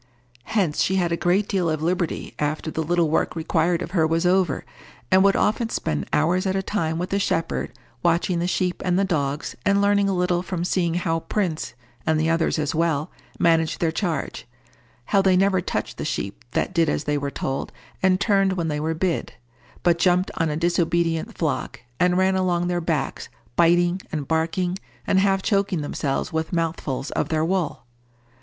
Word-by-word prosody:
Hence 185 -9 0
she 190 - +2
had 175 -3 +1
a - - +2
great 185 +4 +1
deal 180 -4 0
of 155 -1 -2
liberty 175 0 -1
after 150 +2 -1
the 160 - -2
little 170 +1 +2
work 160 - +1
required 165 +1 +1
of - - -7
her 165 -4 +3
was 165 +2 0
over, 180 -5 +2 0.5
and 190 0 +6
would 195 0 +4
often 225 +2 +1
spend 75 - -2
hours 175 +5 +2
at 190 - 0
a 190 - 0
time 160 -6 -1
with 180 +2 -3
the 200 - +1
shepherd, 165 -9 -1 0.3
watching 170 +1 +1
the 175 - 0
sheep 180 0 -1
and 180 -1 +1
the 195 - +3
dogs, 145 -5 -2
and 200 0 +3
learning 200 0 +3
a 195 - 0
little 180 -1 +1
from 180 -1 -3
seeing 170 -2 0
how 165 -2 0
Prince, 170 - -2 0.3
and 155 0 +1
the 160 +1 +2
others 165 0 +1
as 150 -2 -1
well, 160 -2 0 0.3
managed 165 -1 +2
their 165 -2 +1
charge—how 125 - -3
they 190 -1 +4
never 190 -1 +3
touched - - -3
the - - -2
sheep 100 +4 -4
that - - 0
did 165 -3 +3
as 150 - -1
they 150 0 0
were 140 -1 -1
told 135 -1 -3 0.3
and 185 0 +3
turned 195 -2 +3
when 170 -3 -2
they 150 -1 -1
were 160 +2 -1
bid, 170 0 -1 0.5
but 170 -1 +3
jumped 180 +1 +3
on 165 -1 +1
a 150 - -2
disobedient 170 -1 0
flock, - - -2 0.2
and 180 0 +3
ran 190 0 +3
along 180 -2 +1
their 175 0 0
backs, 160 -4 -2 0.3
biting, 175 +2 +3
and 150 -5 -3
barking, 170 +3 0 0.3
and 190 - +3
half 195 -1 +2
choking 195 -5 +1
themselves 145 -1 -2
with 160 0 -2
mouthfuls 165 -5 -2
of - - -1
their 155 0 +1
wool. 180 -3 -1
170 Hz, 190 wpm, -23 LUFS, 160-185 Hz, 0.5 s, and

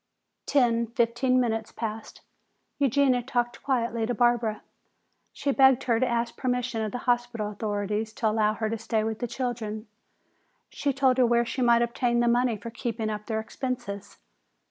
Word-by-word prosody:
Ten, 235 -4 +2
fifteen 240 +2 +1
minutes 225 -3 -1
passed. 220 -1 -6 0.6
Eugenia 275 -2 +3
talked 240 -1 -2
quietly 235 -4 0
to 245 - -1
Barbara. 235 -2 +1 0.7
She 280 - -1
begged 265 -2 +5
her 230 -3 +2
to 255 - +2
ask 235 -1 -1
permission 250 -2 -1
of 215 -1 -2
the - - -3
hospital 240 -3 0
authorities 210 +1 -2
to 225 - -1
allow 215 0 +2
her 220 - -2
to 225 0 -3
stay 220 -1 0
with 220 0 -3
the 245 - -2
children. 225 -4 -4 0.8
She 285 - -1
told 260 -1 +2
her 250 - +6
where 235 0 +3
she 260 - -3
might 235 -1 +5
obtain 240 0 0
the 240 - +2
money 240 -1 +2
for 230 +3 -8
keeping 230 -2 -3
up 210 0 -6
their 220 -2 -1
expenses. 220 -3 -5
235 Hz, 165 wpm, -27 LUFS, 220-250 Hz, 0.8 s, her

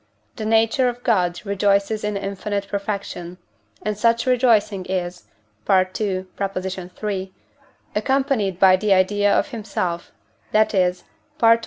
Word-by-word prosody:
the 220 - -5
nature 225 +3 +3
of 245 0 -8
God 180 -6 +1
rejoices 200 +1 +1
in 210 -1 -1
infinite 200 +1 -3
perfection; 200 -3 -4 0.5
and 210 +1 -1
such 230 +2 +2
rejoicing 230 -6 +3
is 180 -1 -3 0.4
(II. 185 -1 +5 0.2
iii.) 190 0 -3 0.6
accompanied 220 -5 0
by 190 -1 +7
the 205 +1 +2
idea 205 +2 +3
of - - +2
himself, 195 -7 -3 0.4
that 215 +1 +3
is 180 -2 +1 0.4
(I. 230 0 +6
xi. - - -14
200 Hz, 125 wpm, -22 LUFS, 185-220 Hz, 0.6 s, by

